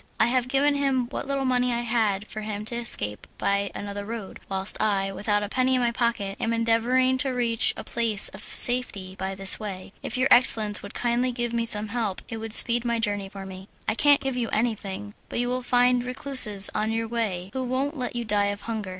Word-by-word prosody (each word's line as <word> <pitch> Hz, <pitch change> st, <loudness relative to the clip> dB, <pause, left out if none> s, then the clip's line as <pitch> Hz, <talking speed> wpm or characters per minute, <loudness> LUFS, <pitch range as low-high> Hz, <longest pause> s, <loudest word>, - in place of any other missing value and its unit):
"I -, -, +5 dB
have 250 Hz, +1 st, 0 dB
given 275 Hz, +3 st, +2 dB
him 275 Hz, -3 st, 0 dB
what 275 Hz, -, -6 dB
little 275 Hz, -1 st, -2 dB
money 250 Hz, -1 st, +1 dB
I 235 Hz, 0 st, -1 dB
had 220 Hz, -4 st, -1 dB
for 215 Hz, 0 st, -8 dB
him 210 Hz, -1 st, -5 dB
to 235 Hz, -, -3 dB
escape 105 Hz, -, -2 dB
by 200 Hz, 0 st, -1 dB
another 205 Hz, 0 st, -6 dB
road, 220 Hz, -2 st, -8 dB
whilst 195 Hz, +1 st, -2 dB
I, 195 Hz, -2 st, 0 dB
without 205 Hz, +1 st, -1 dB
a -, -, -3 dB
penny 260 Hz, +4 st, +1 dB
in 255 Hz, -, +1 dB
my 240 Hz, -1 st, +1 dB
pocket, 230 Hz, -5 st, -2 dB
am 230 Hz, -, -1 dB
endeavouring 240 Hz, +3 st, +1 dB
to 275 Hz, -1 st, 0 dB
reach 240 Hz, -3 st, +1 dB
a -, -, -6 dB
place 225 Hz, -4 st, +1 dB
of -, -, -12 dB
safety 225 Hz, -7 st, +4 dB
by 190 Hz, 0 st, -5 dB
this 195 Hz, 0 st, +5 dB
way. 195 Hz, -3 st, -7 dB
If 240 Hz, -, -5 dB
your 255 Hz, +1 st, +2 dB
excellence 215 Hz, -4 st, +4 dB
would 200 Hz, -, -11 dB
kindly 245 Hz, +1 st, 0 dB
give 240 Hz, -1 st, -3 dB
me 230 Hz, 0 st, -1 dB
some 210 Hz, -1 st, +3 dB
help, 220 Hz, -4 st, -3 dB
it 225 Hz, -, -5 dB
would 220 Hz, -1 st, -5 dB
speed 235 Hz, +1 st, +6 dB
my 235 Hz, -1 st, -1 dB
journey 205 Hz, -3 st, -2 dB
for 195 Hz, -1 st, -9 dB
me." 190 Hz, 0 st, -10 dB, 0.2 s
"I -, -, +1 dB
can't 285 Hz, +5 st, +4 dB
give 270 Hz, -1 st, -3 dB
you 240 Hz, -2 st, -2 dB
anything, 210 Hz, -3 st, -3 dB, 0.2 s
but -, -, -5 dB
you 245 Hz, +1 st, 0 dB
will 255 Hz, +1 st, -2 dB
find 245 Hz, 0 st, +2 dB
recluses 250 Hz, -6 st, +3 dB
on 215 Hz, +1 st, -1 dB
your 225 Hz, 0 st, -2 dB
way 205 Hz, -5 st, -3 dB
who 260 Hz, -, -3 dB
won't 265 Hz, +4 st, -2 dB
let 250 Hz, -3 st, -5 dB
you 240 Hz, -1 st, -3 dB
die 205 Hz, -2 st, +1 dB
of 200 Hz, 0 st, -3 dB
hunger. 220 Hz, -4 st, -5 dB
230 Hz, 225 wpm, -25 LUFS, 205-250 Hz, 0.2 s, speed